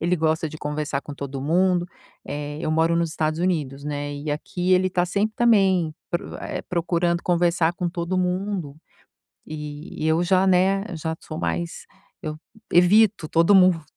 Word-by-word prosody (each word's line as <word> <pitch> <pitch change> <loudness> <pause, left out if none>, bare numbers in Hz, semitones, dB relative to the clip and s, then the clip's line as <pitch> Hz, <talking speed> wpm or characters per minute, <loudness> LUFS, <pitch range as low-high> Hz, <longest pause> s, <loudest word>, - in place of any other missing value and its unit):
ele 175 +2 +1
gosta 160 0 0
de 155 - -10
conversar 150 -1 -3
com 145 - -8
todo 140 -1 -6
mundo. 175 +4 +2 0.4
Eh, 145 +1 -5
eu - - -2
moro 165 +1 +2
nos 170 -1 0
Estados 155 0 -1
Unidos, 150 -6 -1
né, 145 0 -3
e 145 +2 -6
aqui 175 +5 -1
ele 185 0 +3
tá 180 0 +1
sempre 205 +4 -1
também 190 -9 +3 0.2
pro 170 - -3
eh, - - -5
procurando 170 0 0
conversar 170 -1 +2
com 175 - -2
todo 170 +1 -2
mundo. 180 -4 -2 0.7
E 150 0 -6
e - - +2
eu 160 +2 +2
já, 185 +1 +3
né, 190 +2 +3
já 160 0 -3
sou - - -8
mais 85 0 -3 0.4
eu 155 0 -4 0.4
evito 190 0 +5
todo 170 +5 +4
mundo. 180 -4 +5
170 Hz, 170 wpm, -23 LUFS, 150-185 Hz, 0.7 s, evito